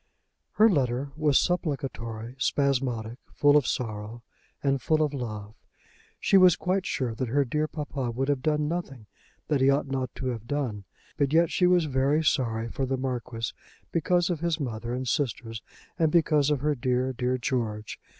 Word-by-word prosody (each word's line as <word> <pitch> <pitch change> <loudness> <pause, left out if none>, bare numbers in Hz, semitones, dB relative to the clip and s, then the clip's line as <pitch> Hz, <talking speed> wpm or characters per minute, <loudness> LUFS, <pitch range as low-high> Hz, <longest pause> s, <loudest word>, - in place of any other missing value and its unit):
Her 220 - +6
letter 135 - 0
was 150 -3 +3
supplicatory, 125 -9 -2
spasmodic, 125 -5 0 0.2
full 145 0 +5
of 145 -4 +4
sorrow, 110 0 -4 0.4
and 135 -2 +1
full 155 -1 +2
of 150 -1 -1
love. 105 -5 -5 0.7
She 195 - +4
was 185 -2 +7
quite 185 +1 -1
sure 125 -4 -1
that 125 +3 -3
her 140 +4 +2
dear 150 +5 0
papa 145 -5 -4
would 130 +3 -2
have 140 -2 0
done 150 +1 +1
nothing 145 -9 -4 0.4
that 145 -3 +1
he 135 - +5
ought 140 0 +2
not 130 -2 -2
to 130 - -3
have 115 -2 -5
done; 125 -8 -2 0.3
but 140 0 +1
yet 165 0 +4
she 180 - +3
was 180 -2 +4
very 140 +2 +1
sorry 115 -6 +1
for 130 +3 -3
the 135 0 -1
Marquis, 125 -3 -3 0.4
because 175 +1 +2
of 170 - -2
his 170 -1 -1
mother 120 -4 -4
and 130 +1 -3
sisters, 115 -4 -2 0.4
and 160 -2 +3
because 155 -4 +3
of 145 -3 0
her 150 +1 +2
dear, 130 0 0
dear 125 +1 0
George. 115 -5 -3
135 Hz, 175 wpm, -27 LUFS, 120-150 Hz, 0.7 s, was